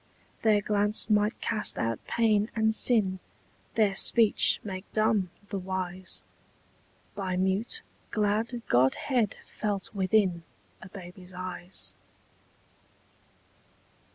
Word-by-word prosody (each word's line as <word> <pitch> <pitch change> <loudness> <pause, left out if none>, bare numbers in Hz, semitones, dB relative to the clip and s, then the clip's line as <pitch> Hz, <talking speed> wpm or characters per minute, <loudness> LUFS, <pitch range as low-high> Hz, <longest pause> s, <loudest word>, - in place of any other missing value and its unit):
Their 215 -2 +4
glance 210 +1 +2
might 210 +1 +2
cast 215 -1 0
out 115 -1 -2
pain 215 -2 +2
and 220 0 +2
sin, 210 -5 +2 0.6
Their 210 -3 +3
speech 225 +2 +5
make 190 -1 -7
dumb 215 -4 +2 0.2
the 200 - -3
wise, 185 0 -4 0.9
By 190 -3 -2
mute 190 +4 0 0.3
glad 220 +3 0
godhead 205 - +2
felt 205 -2 -4
within 190 -3 +2 0.4
A 190 - -10
baby's 180 -1 -11
eyes. 185 0 -6
205 Hz, 100 wpm, -28 LUFS, 185-215 Hz, 0.9 s, speech